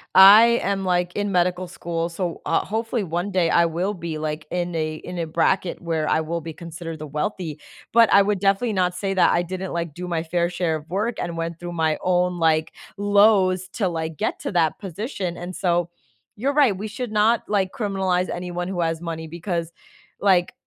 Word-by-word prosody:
I 195 +4 +10 0.2
am, 195 0 -1
like, 180 -1 0
in 205 -1 -1
medical 180 0 +1
school, 170 -2 -3
so, 175 0 -4
uh, 165 - +1
hopefully 225 +1 -2
one 175 +3 -2
day 185 -4 +1
I 170 - +4
will 175 +5 -1
be 170 -4 -5
like 155 0 -4
in 175 -1 -2
a 155 -1 -2
in 180 +3 -8
a 165 - -2
bracket 180 +3 0
where 160 -2 -1
I 160 - +2
will 170 +2 -3
be 160 0 -7
considered 165 -1 -8
the 155 - -6
wealthy, 155 +1 -3 0.3
but 230 -1 +5
I 200 - +8
would 200 0 0
definitely 200 +4 +1
not 180 -2 +1
say 195 +1 -2
that 185 - +4
I 175 - +2
didn't 185 +1 -5
like 170 -3 -3
do 180 +3 -6
my 165 -2 -1
fair 170 +1 0
share 175 -2 -1
of 155 +1 -14
work 215 +5 -1
and 170 -1 -3
went 165 0 -4
through 175 0 -6
my 160 -2 +1
own, 180 -1 +1
like, 160 -1 +2 0.3
lows 200 -2 +4
to 200 -6 0
like 160 -1 -4
get 215 - -2
to - - -4
that 165 -3 +1
position, 195 - -4
and 175 +1 -7
so 175 -2 0 0.5
you're 275 +6 0
right, 275 -8 +4
we 215 +2 -4
should 240 +1 -5
not 215 +2 +3
like 195 -3 +1
criminalize 190 -5 0
anyone 175 0 -4
who 185 - -4
has 165 0 -1
money, 160 -1 -5
because 170 0 -4 0.5
like 185 -1 +3
180 Hz, 205 wpm, -23 LUFS, 165-195 Hz, 0.5 s, I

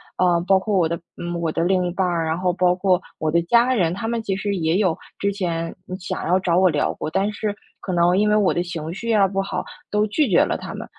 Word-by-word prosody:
啊， 175 -2 +3
包 195 -1 +5
括 205 +2 -2
我 170 -3 +3
的 170 0 -2 0.2
呃， 175 0 -4
我 165 -2 -1
的 165 - -1
另 185 0 +2
一 - - -2
半 185 +1 0
儿， 170 -2 0
然 160 +1 -1
后 180 0 +1
包 180 0 +2
括 185 -1 +2 0.2
我 155 -1 0
的 170 +2 +3
家 235 +8 +3
人， 175 -6 +1
他 225 +5 -4
们 230 0 -1
其 195 -3 -1
实 200 +1 -2
也 165 -1 +1
有 185 -5 +1 0.2
之 200 - +1
前， 170 -4 -3
嗯， 185 - -5
想 180 - -4
要 180 +2 +3
找 180 -2 +1
我 185 0 +5
聊 - - 0
过， - - -4
但 195 +5 0
是 210 0 -3 0.2
可 185 - -4
能 175 +1 +3
因 210 +1 +3
为 210 - +3
我 210 -3 +3
的 175 - 0
情 165 -2 -5
绪 230 +4 -2
啊 205 -2 +5
不 195 +1 -1
好， 195 - -3 0.3
都 210 0 +2
拒 270 +5 +1
绝 180 - +5
了 - - -1
他 - - -8
们。 - - -6
185 Hz, 295 characters per minute, -22 LUFS, 170-200 Hz, 0.3 s, 包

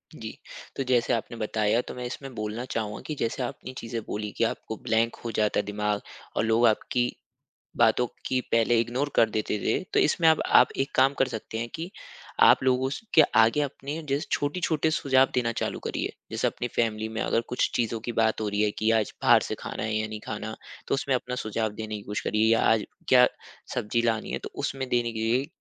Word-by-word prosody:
जी। - - -8 0.4
तो 135 - -1
जैसे 120 -2 +3
आपने 115 +1 -3
बताया 110 +1 +1
तो - - -5
मैं 125 - -6
इसमें 135 +2 -6
बोलना 110 +3 -4
चाहूँगा 105 -2 -3
कि 155 - -3
जैसे 115 +3 -1
आपने 130 +1 -6
चीज़े 115 0 -4
बोली 105 0 -4
की - - +2
आपको 110 - -2
ब्लैंक 115 +1 +1
हो 115 - -2
जाता 105 -1 +1
है - - -1
दिमाग़ 105 0 -1 0.3
और - - +1
लोग 115 +2 +3
आपकी 120 +2 +1 0.7
बातों 125 - +4 0.2
की 130 -1 +1
पहले 115 +1 +4
इग्नोर 125 +5 -1
कर 110 - +5
देते 105 0 -1
थे - - +1 0.2
तो - - +5
इसमें 165 -3 +3
अब 160 - +4
आप 125 - +5
एक 135 +1 0
काम 135 +2 +5
कर 135 - +3
सकते 110 -1 -6
हैं 115 +1 -3
कि, 165 +3 -5 0.5
आप - - +7
लोगों 130 0 +2
स - - -4
के 160 - +9
आगे 115 +6 +5
अपने 145 +2 -4
जिस 140 +2 0
छोटे-छोटे 160 +1 0
सुझाव 135 -4 +3
देना 120 -2 +1
चालू - - -2
करिए। - - -2 0.2
जैसे - - 0
अपनी 120 - -4
फ़ैमिली 110 -1 0
में 110 0 -4
अगर - - +1
कुछ 125 - 0
चीज़ों 115 -1 0
की 120 +1 -4
बात 110 -1 +1
हो 110 - -1
रही 105 +1 0
है 105 - +2
की 110 +1 +2
आज 105 - -2
बाहर - - +6
से - - -3
खाना - - -5
है 110 0 -1
या 110 0 0
नहीं 110 0 -6
खाना, 110 0 -4 0.3
तो - - +2
उसमें 135 -1 0
अपना 125 0 -2
सुझाव 110 0 -1
देने 110 0 -5
की 105 - -8
कोशिश 105 +1 -3
करिए। 110 +1 +2
या 115 - +4
आज 110 -2 +1 0.2
क्या 125 -1 +7 0.5
सब्ज़ी 115 +3 0
लानी 115 -2 0
है - - -1
तो - - -5
उसमें 130 -1 -3
देने 120 -2 +1
के 110 - -6
लिए, 120 +5 +1
115 Hz, 220 wpm, -27 LUFS, 110-130 Hz, 0.7 s, के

